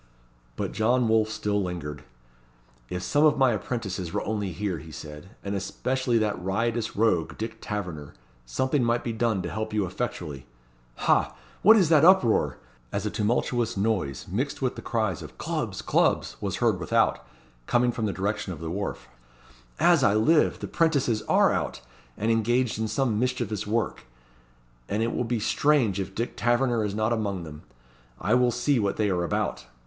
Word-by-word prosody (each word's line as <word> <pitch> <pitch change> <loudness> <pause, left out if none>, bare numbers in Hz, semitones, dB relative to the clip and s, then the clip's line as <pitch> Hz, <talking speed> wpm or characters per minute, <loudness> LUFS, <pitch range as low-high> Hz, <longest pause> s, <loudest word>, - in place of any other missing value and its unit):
But - - -3
John 120 +3 +2
Wolfe 110 -1 +3
still 105 -1 -1
lingered. 75 -5 -5 0.9
"If 90 0 -4
some 145 +1 +2
of 155 -2 +5
my 130 -2 +4
apprentices 100 -5 -3
were - - -2
only 105 -3 -2
here," 95 -1 -3
he 80 +1 -11
said, 75 +3 -9
"and 100 - -3
especially 120 +5 -1
that 105 -4 -1
riotous 115 +4 -1
rogue, 100 -7 +1
Dick 115 0 -5
Taverner, 90 -9 -5 0.3
something 130 - 0
might 120 0 +1
be 115 - -2
done 110 -4 0
to 85 - -4
help 110 0 -4
you 105 -2 +2
effectually. 85 - -5 0.6
Ha! - - +3 0.3
what 220 +3 +8
is 185 -7 +3
that 155 -3 +5
uproar?" 170 - +4 0.3
as 100 +1 -2
a 105 - -1
tumultuous 115 +1 0
noise, 95 - -1
mixed - - -2
with - - -1
the - - -7
cries - - -1
of - - -11
"Clubs! - - -3
Clubs!" - - +1
was - - -2
heard - - +1
without, - - +1 0.4
coming 120 0 +3
from 115 -2 -2
the - - 0
direction 100 0 -2
of 80 - -7
the 80 0 -5
wharf. 95 -9 -4 0.7
"As - - +5
I 100 - +4
live! 150 +9 +3
the - - -4
'prentices 140 -9 +1
are - - +4
out, - - -2 0.4
and 110 +2 +1
engaged 115 +1 +1
in 110 - 0
some 120 -3 0
mischievous 120 -5 -1
work, 110 +1 -1 0.8
and 105 +2 0
it 115 - -1
will 125 - -1
be 115 0 -1
strange 120 -4 +2
if 95 0 -5
Dick 115 +2 -3
Taverner 120 -2 +1
be - - -4
not 110 +2 +1
among 100 -5 -2
them. 75 -1 -9 0.6
I 105 - +1
will 125 0 +4
see 125 +2 +1
what 100 -2 0
they 105 -2 +1
are 90 -1 0
about." 75 -6 -2
110 Hz, 175 wpm, -26 LUFS, 95-120 Hz, 0.9 s, what